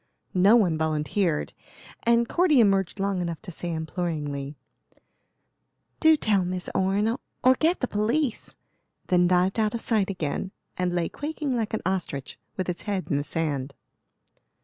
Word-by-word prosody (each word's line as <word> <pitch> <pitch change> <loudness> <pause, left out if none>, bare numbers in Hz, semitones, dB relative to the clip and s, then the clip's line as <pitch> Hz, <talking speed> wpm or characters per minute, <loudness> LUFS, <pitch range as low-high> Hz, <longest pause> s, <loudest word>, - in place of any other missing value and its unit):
No 195 +5 +6
one 180 -9 +3
volunteered, 160 +2 0 0.5
and 235 0 +3
Cordy 340 -4 +3
emerged 195 -3 +2
long 195 -2 0
enough 170 -2 -3
to 190 - -7
say 175 +1 -5
imploringly: 155 -4 -3 1.4
"Do 315 -1 +6
tell 205 -8 +2
Miss 180 0 -4
Orne, 205 +5 +1 0.3
or 255 +1 +7
get 330 +3 +2
the 255 - +1
police;" 235 +5 -1 0.5
then 180 -1 +4
dived 185 +3 +2
out 215 0 +1
of 230 - -3
sight 210 -4 +1
again, 185 0 -3 0.2
and 180 -1 0
lay 170 -2 +1
quaking 295 -3 -3
like 220 -2 -1
an - - -5
ostrich 175 -7 -3 0.2
with 185 - -2
its 180 -1 -3
head 195 -3 -2
in 140 - +2
the 145 - -1
sand. 145 -3 -2
190 Hz, 150 wpm, -26 LUFS, 165-220 Hz, 1.4 s, or